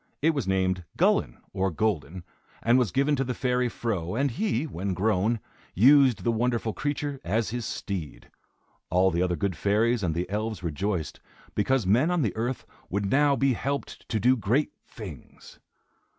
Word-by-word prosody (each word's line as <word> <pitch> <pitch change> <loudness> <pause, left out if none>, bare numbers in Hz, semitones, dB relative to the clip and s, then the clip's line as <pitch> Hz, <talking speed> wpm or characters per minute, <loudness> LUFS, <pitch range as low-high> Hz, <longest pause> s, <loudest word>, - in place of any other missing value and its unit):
It 160 +3 +3
was 140 -7 -2
named 95 -1 +1
Gullin, - - +2 0.2
or 95 +1 +1
Golden, 90 -1 -2 0.4
and 120 +3 +4
was 120 -8 +1
given 140 +2 +2
to 135 - +1
the 125 -1 -3
fairy 125 -1 +1
Fro, 105 -6 -3
and 135 +2 +1
he, 140 - 0
when 95 - -3
grown, 110 +3 +1 0.4
used 130 +3 +5
the 120 - +2
wonderful 115 -1 0
creature 145 -1 -3
as 110 +5 0
his 120 -1 -3
steed. 90 -7 -6 0.6
All 95 +2 +3
the 85 +1 0
other 90 -1 +1
good 100 -1 -1
fairies 110 +6 +2
and 85 -5 -1
the 85 +2 -1
elves 105 0 -3
rejoiced, 85 +1 -2 0.3
because 120 +2 +1
men 120 - +3
on 175 -4 +1
the 110 - -1
earth 120 +4 -3 0.2
would 100 +2 -1
now 145 +1 +4
be 135 -1 +2
helped 140 +4 -4
to 110 - 0
do 125 +4 +4
great 120 +6 +1 0.2
things. 95 - -11
110 Hz, 170 wpm, -27 LUFS, 95-130 Hz, 0.6 s, used